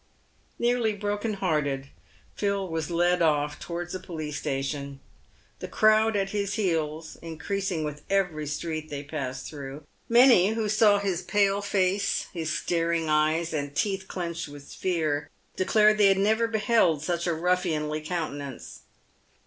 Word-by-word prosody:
Nearly 240 Hz, -2 st, +1 dB
broken 205 Hz, +1 st, -2 dB
hearted, 145 Hz, -7 st, -1 dB, 0.5 s
Phil 200 Hz, -2 st, -1 dB
was 165 Hz, -3 st, -3 dB
led 175 Hz, +1 st, +2 dB
off 150 Hz, -2 st, +1 dB
towards 175 Hz, 0 st, -5 dB
the 185 Hz, -, -3 dB
police 155 Hz, -5 st, -5 dB
station, 140 Hz, -1 st, -3 dB, 0.6 s
the -, -, -5 dB
crowd 215 Hz, 0 st, +4 dB
at 195 Hz, -1 st, 0 dB
his 200 Hz, -2 st, -1 dB
heels 160 Hz, -6 st, -2 dB
increasing 170 Hz, +2 st, -3 dB
with 150 Hz, -1 st, -5 dB
every 180 Hz, -6 st, 0 dB
street 155 Hz, +1 st, -4 dB
they 145 Hz, -1 st, -5 dB
passed 130 Hz, -4 st, -5 dB
through. 140 Hz, 0 st, -8 dB, 0.3 s
Many 235 Hz, -5 st, +6 dB
who 220 Hz, -1 st, -1 dB
saw 215 Hz, -1 st, +5 dB
his 195 Hz, -3 st, -1 dB
pale 200 Hz, +1 st, +2 dB
face, 200 Hz, 0 st, +1 dB
his 160 Hz, -3 st, -3 dB
staring 165 Hz, 0 st, 0 dB
eyes, 155 Hz, +2 st, +2 dB
and 145 Hz, -2 st, -3 dB
teeth 195 Hz, -2 st, -1 dB
clinched 170 Hz, -3 st, -4 dB
with 145 Hz, -1 st, -11 dB
fear, 160 Hz, -5 st, -1 dB, 0.3 s
declared 215 Hz, +2 st, +4 dB
they 205 Hz, -, +7 dB
had 195 Hz, 0 st, +4 dB
never 220 Hz, +4 st, +2 dB
beheld 215 Hz, -, +2 dB
such 170 Hz, +1 st, -1 dB
a 170 Hz, -, +1 dB
ruffianly 160 Hz, -3 st, 0 dB
countenance. 150 Hz, -5 st, -5 dB
170 Hz, 140 wpm, -27 LUFS, 155-200 Hz, 0.6 s, they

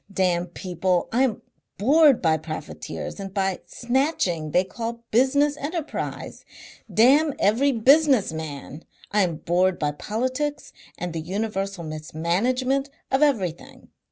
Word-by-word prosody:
Damn 180 Hz, -2 st, +1 dB
people! 180 Hz, 0 st, -1 dB
I 245 Hz, -, +2 dB
am 255 Hz, -6 st, 0 dB, 0.3 s
bored 280 Hz, +3 st, +5 dB
by 160 Hz, -1 st, +4 dB
profiteers 155 Hz, +5 st, -7 dB
and 195 Hz, -1 st, -6 dB
by 195 Hz, -1 st, 0 dB
the -, -, -28 dB
snatching 240 Hz, -, -1 dB
they 180 Hz, +4 st, +3 dB
call 230 Hz, +4 st, -6 dB
business 285 Hz, +5 st, +3 dB
enterprise. 315 Hz, +2 st, -5 dB, 0.5 s
Damn 280 Hz, +6 st, +4 dB
every 245 Hz, +8 st, +3 dB
business 265 Hz, -, +4 dB
man! 155 Hz, -1 st, -7 dB, 0.3 s
I 210 Hz, 0 st, +3 dB
am 175 Hz, -4 st, +1 dB
bored 175 Hz, +3 st, +1 dB
by 150 Hz, -1 st, 0 dB
politics 255 Hz, -, -3 dB, 0.2 s
and 175 Hz, -1 st, -4 dB
the 165 Hz, -, -3 dB
universal 195 Hz, 0 st, -3 dB
mismanagement 190 Hz, -, -1 dB, 0.2 s
of 265 Hz, +2 st, +2 dB
everything. 200 Hz, -, -1 dB
205 Hz, 130 wpm, -24 LUFS, 175-265 Hz, 0.5 s, bored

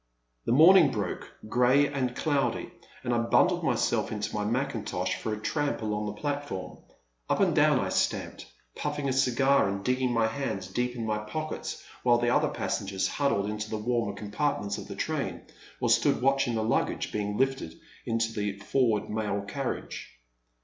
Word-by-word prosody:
The -, -, 0 dB
morning 165 Hz, +4 st, +8 dB
broke, 105 Hz, -6 st, -4 dB, 0.2 s
grey 125 Hz, +5 st, +4 dB
and 130 Hz, -3 st, -2 dB
cloudy, 140 Hz, -6 st, 0 dB, 0.3 s
and 120 Hz, -, 0 dB
I 120 Hz, -, +2 dB
bundled 115 Hz, -, +3 dB
myself -, -, +1 dB
into 105 Hz, -1 st, -3 dB
my 105 Hz, -, -1 dB
mackintosh 115 Hz, -5 st, -1 dB
for 110 Hz, -, -4 dB
a 105 Hz, -, -2 dB
tramp 145 Hz, +1 st, -1 dB
along 105 Hz, 0 st, -1 dB
the 105 Hz, 0 st, -6 dB
platform 145 Hz, -9 st, -4 dB, 0.5 s
Up -, -, +1 dB
and -, -, +3 dB
down -, -, +5 dB
I -, -, -1 dB
stamped, -, -, -1 dB, 0.3 s
puffing 145 Hz, -1 st, -2 dB
a 130 Hz, -, +1 dB
cigar, 135 Hz, -1 st, +3 dB
and 100 Hz, 0 st, -4 dB
digging 125 Hz, 0 st, +1 dB
my 115 Hz, -2 st, +2 dB
hands 125 Hz, +4 st, -2 dB
deep 125 Hz, 0 st, -2 dB
in 115 Hz, -2 st, -3 dB
my 105 Hz, -1 st, 0 dB
pockets, 155 Hz, +9 st, -5 dB, 0.2 s
while 120 Hz, -1 st, +4 dB
the 120 Hz, 0 st, +1 dB
other -, -, +3 dB
passengers 95 Hz, -1 st, -2 dB
huddled 120 Hz, -8 st, 0 dB
into 105 Hz, 0 st, -4 dB
the 110 Hz, -, -2 dB
warmer 115 Hz, -2 st, -1 dB
compartments 105 Hz, +1 st, -2 dB
of -, -, -9 dB
the -, -, -7 dB
train -, -, -2 dB, 0.4 s
or -, -, 0 dB
stood -, -, +3 dB
watching 135 Hz, -2 st, +2 dB
the 110 Hz, -, 0 dB
luggage 110 Hz, -, 0 dB
being 105 Hz, 0 st, -2 dB
lifted 135 Hz, -11 st, 0 dB, 0.3 s
into 115 Hz, 0 st, -1 dB
the 105 Hz, -2 st, -2 dB
forward 110 Hz, +1 st, +1 dB
mail 105 Hz, -2 st, -2 dB
carriage. 135 Hz, +5 st, -5 dB
120 Hz, 170 wpm, -28 LUFS, 105-135 Hz, 0.5 s, morning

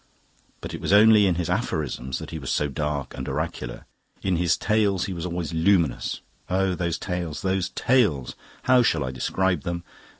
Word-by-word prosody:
But -, -, -6 dB
it -, -, -6 dB
was -, -, -1 dB
only 105 Hz, 0 st, +7 dB
in 90 Hz, -, +2 dB
his 85 Hz, -1 st, -2 dB
aphorisms 65 Hz, -3 st, -2 dB
that -, -, -8 dB
he 80 Hz, -, -5 dB
was 65 Hz, -, -6 dB
so 75 Hz, -, +1 dB
dark 75 Hz, -1 st, -3 dB
and 65 Hz, -, -5 dB
oracular. -, -, -4 dB, 0.4 s
In 95 Hz, -3 st, +1 dB
his 85 Hz, -1 st, +2 dB
Tales 100 Hz, -4 st, +1 dB
he 95 Hz, -, -4 dB
was 85 Hz, 0 st, -4 dB
always 85 Hz, -3 st, -4 dB
luminous. 80 Hz, -4 st, +1 dB, 0.3 s
Oh, 95 Hz, 0 st, +1 dB
those 85 Hz, -2 st, -1 dB
Tales 90 Hz, -5 st, -4 dB
those 95 Hz, -1 st, 0 dB
Tales! 105 Hz, -, +1 dB, 0.3 s
How 130 Hz, -1 st, +5 dB
shall 80 Hz, -, +1 dB
I 65 Hz, -, -3 dB
describe 90 Hz, +5 st, 0 dB
them? 85 Hz, +3 st, -4 dB
85 Hz, 180 wpm, -25 LUFS, 75-95 Hz, 0.4 s, only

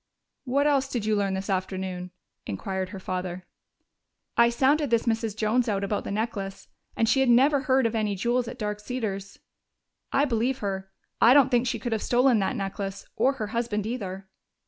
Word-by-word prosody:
"What 280 Hz, +3 st, +1 dB
else 275 Hz, -2 st, +3 dB
did 240 Hz, -5 st, -3 dB
you 215 Hz, 0 st, +2 dB
learn 200 Hz, -2 st, 0 dB
this 190 Hz, +1 st, -4 dB
afternoon?" 185 Hz, -1 st, -3 dB, 0.4 s
inquired 190 Hz, -, -3 dB
her 195 Hz, 0 st, -7 dB
father. 185 Hz, -1 st, -4 dB, 0.9 s
"I 235 Hz, 0 st, +6 dB
sounded 275 Hz, +4 st, +2 dB
this 230 Hz, -1 st, +2 dB
Mrs. 225 Hz, -2 st, -1 dB
Jones 225 Hz, +3 st, +1 dB
out 200 Hz, -1 st, 0 dB
about 200 Hz, +1 st, -2 dB
the -, -, -4 dB
necklace, 200 Hz, -2 st, -3 dB, 0.3 s
and 225 Hz, -, +2 dB
she 270 Hz, -, +3 dB
had 265 Hz, -2 st, +3 dB
never 275 Hz, +4 st, +5 dB
heard 265 Hz, -2 st, +2 dB
of 230 Hz, -, +1 dB
any 215 Hz, -3 st, 0 dB
jewels 240 Hz, +5 st, 0 dB
at 250 Hz, -, -7 dB
Dark 210 Hz, -3 st, -3 dB
Cedars. 210 Hz, -4 st, -4 dB, 0.7 s
I 280 Hz, -, +3 dB
believe 250 Hz, 0 st, 0 dB
her 195 Hz, -4 st, -4 dB, 0.3 s
I 240 Hz, +3 st, +7 dB
don't 275 Hz, -2 st, +6 dB
think 245 Hz, 0 st, +3 dB
she 240 Hz, -1 st, 0 dB
could 235 Hz, +2 st, -4 dB
have 220 Hz, -2 st, 0 dB
stolen 245 Hz, -1 st, +3 dB
that 195 Hz, -, 0 dB
necklace 195 Hz, 0 st, -4 dB
or 255 Hz, +5 st, +3 dB
her 220 Hz, -6 st, -4 dB
husband, 225 Hz, -3 st, -1 dB
either." 195 Hz, -5 st, -5 dB
220 Hz, 190 wpm, -26 LUFS, 195-250 Hz, 0.9 s, I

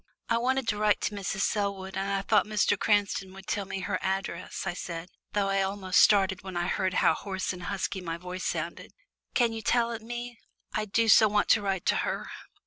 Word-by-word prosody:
"I 230 Hz, -, +3 dB
wanted 260 Hz, +1 st, 0 dB
to 210 Hz, -, 0 dB
write 210 Hz, 0 st, +3 dB
to 210 Hz, -, -2 dB
Mrs. 195 Hz, -1 st, -3 dB
Selwood, 200 Hz, -2 st, -1 dB
and 195 Hz, +1 st, -1 dB
I 195 Hz, 0 st, 0 dB
thought 210 Hz, +1 st, +3 dB
Mr. 210 Hz, -1 st, +2 dB
Cranston 200 Hz, -2 st, +1 dB
would 195 Hz, 0 st, -11 dB
tell 200 Hz, -1 st, -2 dB
me 195 Hz, 0 st, -5 dB
her 185 Hz, -1 st, -2 dB
address," 190 Hz, -2 st, -3 dB
I 190 Hz, -, -1 dB
said, 170 Hz, -1 st, -6 dB, 0.2 s
though 205 Hz, -1 st, +1 dB
I 195 Hz, 0 st, +2 dB
almost 190 Hz, -1 st, +1 dB
started 190 Hz, -2 st, +4 dB
when 185 Hz, -2 st, -6 dB
I 175 Hz, -, 0 dB
heard 185 Hz, 0 st, 0 dB
how -, -, +4 dB
hoarse 190 Hz, -2 st, -3 dB
and 180 Hz, -, -9 dB
husky 195 Hz, -1 st, -2 dB
my 165 Hz, -2 st, -4 dB
voice 180 Hz, +1 st, -6 dB
sounded. -, -, -4 dB, 0.4 s
"Can 235 Hz, -3 st, +3 dB
you 225 Hz, -, -5 dB
tell 235 Hz, +2 st, +2 dB
it 230 Hz, -1 st, -5 dB
me? 240 Hz, +1 st, -6 dB, 0.3 s
I 215 Hz, -, -1 dB
do 225 Hz, +2 st, +1 dB
so 220 Hz, 0 st, +7 dB
want 205 Hz, 0 st, +1 dB
to 215 Hz, -, +5 dB
write 195 Hz, -2 st, -2 dB
to -, -, +3 dB
her." -, -, -2 dB
195 Hz, 220 wpm, -28 LUFS, 190-215 Hz, 0.4 s, so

